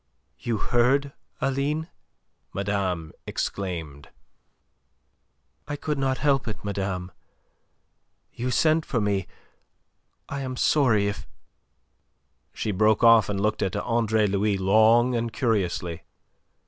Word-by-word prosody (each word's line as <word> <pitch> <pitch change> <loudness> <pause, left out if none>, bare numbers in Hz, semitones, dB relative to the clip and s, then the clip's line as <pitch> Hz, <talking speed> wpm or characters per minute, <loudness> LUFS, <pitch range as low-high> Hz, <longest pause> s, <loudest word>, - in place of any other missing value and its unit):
"You 115 -2 -2
heard, 130 +6 +2 0.3
Aline?" 140 +4 -1 0.7
madame 95 -5 -2 0.2
exclaimed. 80 -6 -4 1.6
"I 145 - -3
could 150 0 -3
not 135 -1 0
help 140 -4 +1
it, 110 -1 -6
madame. 95 -2 -3 1.2
You 125 +1 -3
sent 155 +4 +3
for 125 - -1
me. 100 -3 0 1.0
I 140 0 -4
am 130 -1 -4
sorry 115 -10 +3
if..." 100 -8 -5 1.2
She 110 - -3
broke 110 +3 +2
off, 115 -3 +6
and 100 -1 -2
looked 105 +1 0
at 95 -2 -1
Andre 110 -2 +1
Louis 100 0 +1
long 110 +6 +4
and 115 -1 -1
curiously. 90 - -1
110 Hz, 110 wpm, -25 LUFS, 100-130 Hz, 1.6 s, off